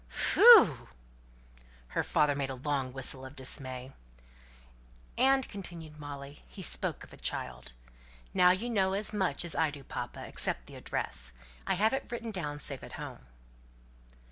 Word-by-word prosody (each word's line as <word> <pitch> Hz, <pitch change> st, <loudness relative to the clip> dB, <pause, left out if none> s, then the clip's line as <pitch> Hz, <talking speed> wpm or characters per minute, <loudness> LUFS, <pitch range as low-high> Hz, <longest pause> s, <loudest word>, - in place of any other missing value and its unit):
"Phew!" 300 Hz, -, +7 dB, 1.0 s
Her -, -, 0 dB
father 150 Hz, -1 st, +2 dB
made 140 Hz, -1 st, -2 dB
a 130 Hz, -, -4 dB
long 135 Hz, -1 st, -2 dB
whistle 130 Hz, 0 st, -1 dB
of 130 Hz, +2 st, -10 dB
dismay. 130 Hz, -1 st, -3 dB, 1.2 s
"And," 265 Hz, +1 st, +3 dB
continued 170 Hz, -6 st, -9 dB
Molly, 145 Hz, -1 st, -9 dB
"he 190 Hz, -, -9 dB
spoke -, -, -1 dB
of -, -, -14 dB
a -, -, -12 dB
child. 60 Hz, 0 st, -3 dB, 0.6 s
Now 180 Hz, 0 st, +6 dB
you 185 Hz, +6 st, +1 dB
know 195 Hz, -5 st, +1 dB
as 205 Hz, +2 st, -1 dB
much 185 Hz, -6 st, 0 dB
as 170 Hz, -, -2 dB
I 160 Hz, -1 st, +2 dB
do, 145 Hz, -1 st, -10 dB
papa, 120 Hz, -2 st, -6 dB
except -, -, -1 dB
the -, -, -13 dB
address. -, -, -2 dB, 0.3 s
I -, -, +2 dB
have 215 Hz, +5 st, +2 dB
it 270 Hz, -2 st, -3 dB
written 235 Hz, -1 st, -4 dB
down 150 Hz, -7 st, -4 dB
safe 145 Hz, -, -2 dB
at -, -, -10 dB
home." 65 Hz, -, -8 dB
150 Hz, 155 wpm, -31 LUFS, 135-195 Hz, 1.2 s, Phew